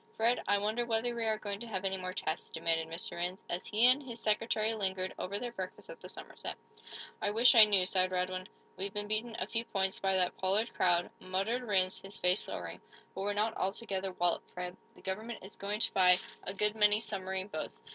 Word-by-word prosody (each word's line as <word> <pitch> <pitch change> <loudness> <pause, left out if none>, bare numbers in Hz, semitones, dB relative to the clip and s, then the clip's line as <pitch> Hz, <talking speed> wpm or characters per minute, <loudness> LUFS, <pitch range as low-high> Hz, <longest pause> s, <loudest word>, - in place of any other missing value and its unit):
"Fred, 230 +2 +2
I 205 +1 +4
wonder 215 +4 0
whether 235 +1 +1
we 235 -1 -2
are 220 -1 +2
going 205 -2 -3
to 235 - -6
have 195 -3 -3
any 190 0 0
more 185 -1 -4
tests," - - -3
demanded 165 -1 0
Mr. 165 +2 -4
Rhinds, 180 +2 -2
as 175 - -3
he 220 +3 +4
and 255 +3 +6
his 240 -4 -7
secretary 220 0 +1
lingered 190 -3 -1
over 200 +2 -2
their 240 +2 -4
breakfast 190 - -7
at - - -12
the - - -9
Somerset. - - -7 0.6
"I - - +1
wish 230 +5 +6
I 225 -3 +10
knew," 200 -3 +3
sighed 185 0 +3
Radwin. 185 0 -2 0.3
"We've 195 +2 -3
been 205 0 -4
beaten, 220 +2 -2
a - - -1
few 230 0 -1
points, 190 -4 0
by 190 -1 +1
that 180 -1 +2
Pollard 200 +5 +1
crowd," 175 -1 +2
muttered 195 +7 -1
Rhinds, 190 -5 +1
his 195 +1 -6
face 180 +2 +3
lowering. - - -5 0.3
"But 190 - -5
we're 205 +1 0
not 215 +2 0
altogether 195 -1 -2
walloped, 175 -1 +2
Fred. 180 0 -5 0.2
The - - -17
government 215 +4 -4
is 190 - -10
going 205 +2 -3
to - - +5
buy 180 -1 +6 0.3
a 190 - -3
good 210 +1 +1
many 210 -1 +5
submarine 190 -3 -3
boats. 155 - -6
200 Hz, 215 wpm, -32 LUFS, 185-220 Hz, 0.6 s, I